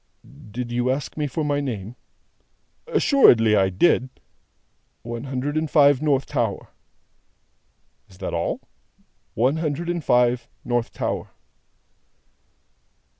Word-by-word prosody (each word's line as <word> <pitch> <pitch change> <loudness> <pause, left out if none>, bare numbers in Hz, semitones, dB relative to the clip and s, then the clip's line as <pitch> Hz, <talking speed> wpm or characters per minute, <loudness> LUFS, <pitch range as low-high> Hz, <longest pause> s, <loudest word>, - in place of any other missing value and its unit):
"Did 120 +3 -5
you 120 +1 0
ask 135 +2 -2
me 150 -1 -1
for 150 +3 -3
my 145 -1 0
name?" 115 -5 -5 0.9
"Assuredly 115 - +5
I 95 -2 +3
did." 125 - +2 0.9
"One 120 +2 -6
Hundred 135 +2 -3
and 155 0 -1
Five, 145 -3 +5
North 140 -3 +1
Tower." 115 -8 -2 1.4
"Is 90 - -18
that - - -5
all?" - - -2 0.7
"One 130 +7 +2
Hundred 160 +1 -2
and 175 -2 -2
Five, 125 -1 +2 0.2
North 120 -1 -1
Tower." - - -3
130 Hz, 115 wpm, -23 LUFS, 120-145 Hz, 1.4 s, Assuredly